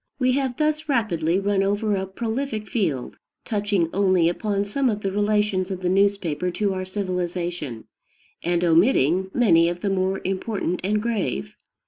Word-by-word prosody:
We 255 -2 +2
have 260 -2 -1
thus 305 0 0
rapidly 180 - +1
run 200 0 +1
over 205 +2 +1
a 190 0 -2
prolific 220 +2 -3
field, 165 - -2 0.3
touching 205 -5 0
only 185 -4 +3
upon 200 +2 -1
some 260 +6 0
of 210 -2 -2
the 195 - -1
relations 205 -2 +1
of 190 -1 -4
the 180 - 0
newspaper 185 -4 +1
to 200 +2 -1
our 185 0 -3
civilization, 175 - -3 0.6
and 175 +1 0
omitting 175 - +3
many 170 -9 +4
of 175 0 -5
the 200 - 0
more 190 0 0
important 190 -1 -2
and 210 +2 0
grave. 180 - -2
195 Hz, 155 wpm, -23 LUFS, 175-210 Hz, 0.6 s, many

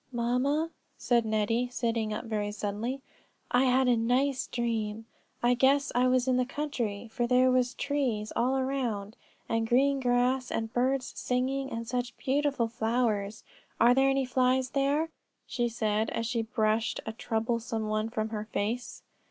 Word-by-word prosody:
"Mamma," 255 +7 0 0.3
said 235 -2 +1
Nettie, 220 +3 +1
sitting 230 -3 -1
up 210 - -4
very 210 -2 -2
suddenly, 215 +6 -3 0.5
"I 250 +2 +4
had 260 0 +3
a 245 - +5
nice 250 +4 +1
dream; 225 -2 -2 0.4
I 240 +1 +5
guess 275 +3 +3
I 250 +1 +3
was 255 0 +2
in 255 -1 +3
the 255 - +3
country, 245 -7 -3
for 240 +1 -1
there 255 +1 +4
were 255 0 +4 0.2
trees 255 -7 -1
all 255 +3 +2
around, 245 -6 -2 0.3
and 225 0 0
green 275 +3 +3
grass, 250 +1 +1
and 225 0 -3
birds 255 +1 0
singing; 265 +2 -1
and 230 0 -4
such 245 0 -3
beautiful 275 -3 0
flowers! 220 -3 -1 0.4
Are 240 +2 +6
there 270 +1 +4
any 270 0 +1
flies 255 0 +1
there?" 285 +4 +1 0.4
she 240 -2 -1
said, 220 -1 0
as 230 - -2
she 235 0 0
brushed 220 0 0
a 220 - -4
troublesome 225 -1 -2
one 215 +1 -1
from 220 -1 -2
her 215 -1 -4
face. 225 +3 -3
245 Hz, 160 wpm, -29 LUFS, 225-260 Hz, 0.5 s, Are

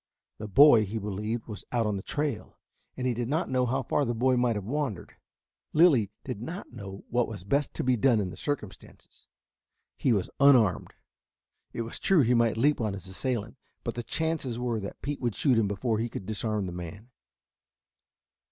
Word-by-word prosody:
The 110 - -5
boy, 120 +1 +7
he 105 +2 -4
believed, 105 +2 -3
was 105 -4 -8
out 120 -2 +1
on 105 -1 0
the 95 - -4
trail, 145 -2 -3 0.4
and 130 - -3
he 125 - +2
did 120 0 -3
not 155 +2 -1
know 125 -1 +2
how 130 +2 0
far 145 - +1
the 120 -3 -1
boy 130 +3 +3
might 120 -2 +2
have 105 -2 -4
wandered. 130 - -3 0.6
Lilly 150 - +5
did 125 -6 -5
not 170 - -7
know 100 -4 -8
what 120 0 +2
was 105 -5 -8
best 140 +8 0
to - - -2
be 125 0 +3
done 120 0 +3
in 95 -3 -2
the - - -9
circumstances. 135 -10 -7 0.7
He 130 - +1
was 100 -5 0
unarmed. 125 -9 +4 0.8
It 115 - -3
was 115 - -7
true 190 -5 +4
he 125 -1 +3
might 115 -2 +2
leap 145 +3 +2
on 105 -3 -1
his 95 -2 -8
assailant, 115 +4 -3 0.3
but 115 - -3
the 120 - -4
chances 155 -3 -2
were 120 -2 -1
that 100 -1 -8
Pete 145 +1 -3
would 120 -4 -1
shoot 130 -6 +3
him 105 - +2
before 110 +3 -1
he 115 +1 -1
could 100 - -7
disarm 110 -1 -2
the 90 - -5
man. 90 +7 -8
115 Hz, 200 wpm, -28 LUFS, 105-130 Hz, 0.8 s, boy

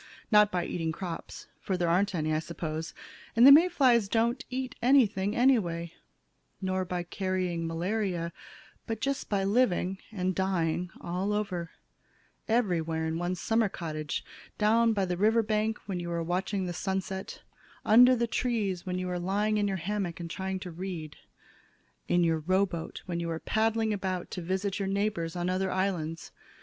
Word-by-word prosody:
Not 210 -1 +6
by 175 -1 -1
eating 165 -2 -2
crops 170 0 -6
for 190 - -2
there 175 -1 0
aren't 190 +3 +2
any, 155 -1 0
I 155 - +2
suppose, 160 -1 -5 0.4
and 235 +2 +7
the 275 - +11
May 330 +6 +8
flies 245 - +3
don't 235 +5 +1
eat 260 0 -3
anything 220 -6 +3
anyway 175 -10 +2 0.7
nor 185 -1 -1
by 180 -1 -3
carrying 180 -2 -2
malaria, 175 0 -2 0.5
but 225 -2 -3
just 275 +3 -2
by 200 -2 +1
living 195 -3 +1
and 185 -3 -1
dying 180 -2 0
all 185 +4 -2
over; 185 -5 -2 0.8
everywhere 170 -8 +1
in 160 +1 -2
one's 175 0 -2
summer 225 +3 +2
cottage, 155 -4 -4 0.3
down 225 +1 +3
on 195 -1 +1
the 180 0 -2
river 220 +4 +3
bank 215 +1 0
where 190 -3 -3
you 175 0 -5
are 170 -1 -1
watching 185 +3 -1
the 175 - -3
sunset, 190 +1 -4 0.4
under 250 +4 +7
the 235 -1 +1
trees 215 -6 -1
when 180 0 -1
you 185 0 -3
are 180 -1 -2
lying 205 +4 0
in 205 - +1
your 195 -1 -1
hammock 190 -1 -3
and 170 -1 -6
trying 190 +1 -3
to 180 - -6
read, 170 -3 -6 0.9
in 175 0 +3
your 165 -1 +2
rowboat 185 0 -1
when 175 -2 -3
you 170 0 -3
are 165 - -2
paddling 220 +1 +1
about 185 -3 -3
to 180 - -4
visit 190 +3 -2
your 195 - -1
neighbors 195 -4 -1
on 175 0 -2
other 185 +1 0
islands. 175 -4 -2
190 Hz, 170 wpm, -29 LUFS, 175-210 Hz, 0.9 s, the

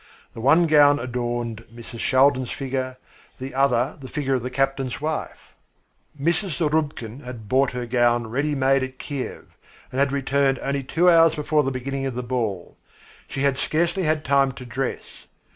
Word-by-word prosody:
The 115 - -8
one 155 +8 +5
gown 145 -2 +6
adorned 120 -3 -3
Mrs. 115 0 -10
Shaldin's 130 -1 +3
figure, 130 -2 -3 0.4
the 130 +1 -7
other 130 -1 +1
the 130 - -8
figure 135 0 -2
of 130 - +1
the 125 - -4
captain's 135 0 -1
wife. 155 +1 -5 0.7
Mrs. 170 +3 0
Zarubkin 150 -7 -1
had 120 -4 -9
bought 130 +3 +2
her 125 -1 -3
gown 120 -1 +2
ready 140 +6 -1
made 135 0 +3
at 130 0 -5
Kiev, 140 -2 -6 0.4
and 130 - -3
had 140 0 +2
returned 140 -1 +1
only 140 0 -1
two 165 +7 +1
hours 165 -2 +6
before 150 0 +1
the 135 - -1
beginning 135 +1 -3
of 130 - -5
the 125 - -3
ball. 115 -7 -3 0.5
She 135 - -4
had 140 -2 +1
scarcely 170 +4 0
had 155 -2 0
time 135 -1 +3
to 125 - -10
dress. 125 +2 -5
135 Hz, 170 wpm, -23 LUFS, 125-145 Hz, 0.7 s, gown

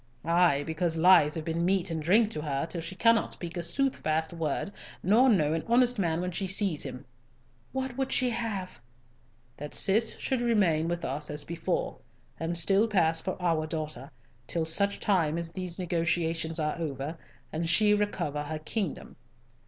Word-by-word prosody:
"Ay, 170 -4 +3
because 165 +1 -1
lies 165 -3 +6
have 160 -1 -4
been 165 +1 -1
meat 185 0 +1
and 160 -1 -2
drink 210 +7 +3
to 150 - -3
her, 145 0 -2
till 165 +1 -4
she 170 +3 -6
cannot 230 +2 +3
speak 175 0 -7
a 175 - -2
soothfast 170 - -1
word 165 +3 -2 0.3
nor 230 +8 +5
know 155 -9 +3
an 165 - -2
honest 245 0 +3
man 170 -3 0
when 180 0 -2
she 190 +2 -2
sees 190 -4 0
him." 125 +3 -6 0.7
"What 265 -1 -4
would 265 0 -1
she 250 -2 +2
have?" 205 - -4 0.8
"That 150 +1 -4
Cis 220 +3 +3
should 260 -2 -1
remain 190 -10 +2
with 170 0 -2
us 145 +3 -3
as 150 0 -3
before, 330 - -3 0.4
and 165 +1 -2
still 195 +6 +3
pass 165 -6 +2
for 185 +2 -4
our 165 -3 0
daughter, 155 -4 -5 0.4
till 165 -2 -1
such 200 +5 +2
time 170 -6 +1
as 170 -1 -4
these 180 -1 -5
negotiations 165 -2 -1
are 150 +2 -1
over, 150 0 -4 0.3
and 165 +1 -1
she 210 +4 +5
recover 205 -8 -1
her 155 +1 -4
kingdom. 170 +3 -4
170 Hz, 175 wpm, -28 LUFS, 160-200 Hz, 0.8 s, lies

